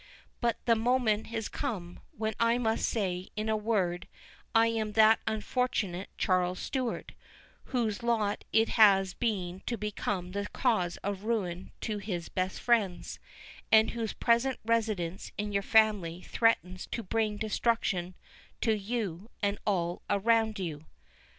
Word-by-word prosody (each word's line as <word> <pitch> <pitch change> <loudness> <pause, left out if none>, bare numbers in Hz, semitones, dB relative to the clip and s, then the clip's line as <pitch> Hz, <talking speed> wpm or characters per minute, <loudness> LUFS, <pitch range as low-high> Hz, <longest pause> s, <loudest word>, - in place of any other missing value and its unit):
But 235 -2 +1
the 235 - +5
moment 225 -2 +1
is 225 -2 -2
come, 190 -11 -4
when 220 0 -3
I 230 +1 +3
must 225 -2 0
say, 185 -4 -2
in 215 +1 -2
a 220 - +2
word, 200 -5 0 0.5
I 225 0 +6
am 220 -2 -1
that 220 +1 +6
unfortunate 215 -5 -1
Charles 185 -1 +1
Stewart, 255 +1 -3 0.5
whose 230 -4 -1
lot 225 -3 0
it 225 0 +3
has 195 -4 +5
been 190 -6 -2
to 235 - -1
become 200 -3 -3
the 200 +1 -3
cause 210 -10 0
of 200 0 -3
ruin 190 -6 -2
to 215 -2 -2
his 180 -5 -4
best 185 0 -2
friends, 210 -7 +1 0.5
and 220 0 +6
whose 230 -2 -3
present 240 +2 +2
residence 215 -6 -1
in 210 0 -2
your 200 0 +1
family 195 -5 +3
threatens 185 -5 +1
to 230 - -4
bring 215 +1 0
destruction 210 -4 0 0.5
to 220 -2 +3
you, 205 -2 -3
and 200 0 +1
all 175 -4 0
around 220 +1 +2
you." 160 -5 -5
215 Hz, 140 wpm, -30 LUFS, 185-230 Hz, 0.5 s, I